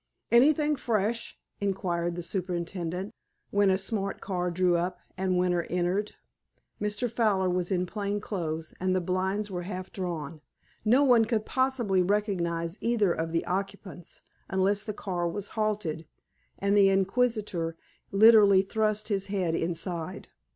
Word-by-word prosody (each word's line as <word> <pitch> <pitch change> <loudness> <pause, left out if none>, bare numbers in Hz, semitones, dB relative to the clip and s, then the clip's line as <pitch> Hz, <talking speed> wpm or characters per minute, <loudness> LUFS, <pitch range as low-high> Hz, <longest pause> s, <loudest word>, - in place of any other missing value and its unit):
"Anything 295 +5 +5
fresh?" 230 -2 -1 0.2
inquired 175 -4 -1
the 175 - -5
superintendent, 180 +1 -3 0.4
when 200 -1 +3
a 190 - +3
smart 195 0 -2
car 180 -2 -2
drew 180 0 +2
up, 180 +1 -1 0.2
and 185 -1 0
Winter 180 -1 +2
entered. 180 +4 -1 0.7
Mr. 210 +3 -1
Fowler 210 -5 +1
was 180 0 -1
in 180 -1 +1
plain 205 +1 -3
clothes, 165 -6 -4
and 185 0 +1
the - - +3
blinds 190 +3 -1
were 180 -1 -3
half 185 0 -6
drawn. 165 -5 -4 0.4
No 245 +6 +4
one 245 -5 +5
could 220 -2 -1
possibly 255 -8 +1
recognize 180 -3 -1
either 215 -6 +2
of 160 0 -3
the 165 - 0
occupants 195 -2 -5 0.3
unless 195 +2 +1
the 215 - -3
car 175 -4 -2
was 205 +3 -5
halted, 205 -8 -2 0.5
and 200 +1 +1
the 200 -1 +6
inquisitor 195 -4 0 0.3
literally 205 -2 +7
thrust 215 +1 -1
his 195 -2 -1
head 190 -5 -1
inside. 170 +2 -3
190 Hz, 140 wpm, -28 LUFS, 175-210 Hz, 0.7 s, literally